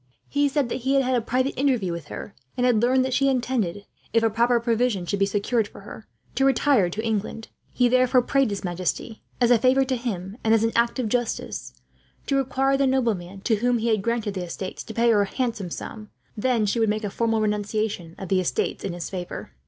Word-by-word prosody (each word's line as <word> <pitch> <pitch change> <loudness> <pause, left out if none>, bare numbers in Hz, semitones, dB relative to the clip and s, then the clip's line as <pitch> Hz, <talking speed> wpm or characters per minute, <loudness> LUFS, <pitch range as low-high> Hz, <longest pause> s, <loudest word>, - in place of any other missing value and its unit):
He 285 0 +1
said 275 -2 0
that - - -2
he 265 +3 +1
had 270 - +4
had 250 0 +1
an 275 - -1
interview 250 -9 0
with 170 -3 -5
her, - - -7 0.2
and 250 - +2
had 240 -4 +3
learned 255 +2 +3
that 260 - -2
she 275 +1 +3
intended, 235 -7 -1 0.3
if 230 - +3
a 225 - +3
proper 235 +2 +3
provision 230 -4 0
should 200 +3 -2
be 195 - +3
secured 205 +2 0
for - - -13
her, 210 +2 -11 0.3
to 270 - +1
retire 270 -7 +3
to 220 +6 -4
England. 220 0 -3 0.2
He 245 - +3
therefore 255 0 +4
prayed 275 -1 +2
his 200 -1 -4
majesty, 185 +5 -3 0.2
as 245 -1 +4
a 240 - +6
favour 260 +3 +4
to 260 0 0
him 205 -5 -4
and 225 0 +4
as 225 - +2
an 225 - +2
act 235 +2 +2
of 250 -3 -1
justice, 65 - -3 0.5
to 275 - 0
require 270 0 +1
the 275 0 +2
nobleman 205 -8 -1
to 220 +1 +1
whom 245 +3 +2
he 230 +1 -1
had 215 -3 +2
granted 230 -1 -1
the 185 -2 -3
estates 185 +2 -6
to 220 - -8
pay 235 0 +4
her 210 -2 +4
a - - +2
handsome 230 -6 -2
sum, 215 +5 -7 0.3
when 230 0 +1
she 210 +3 0
would 225 -2 +2
make 215 +1 -1
a 205 - -3
formal 225 +1 0
renunciation 210 -4 -2
of 190 - -7
the 190 - +3
estates 180 - -1
in 190 - -3
his 175 -1 -5
favour. 180 - -6
225 Hz, 230 wpm, -24 LUFS, 200-250 Hz, 0.5 s, a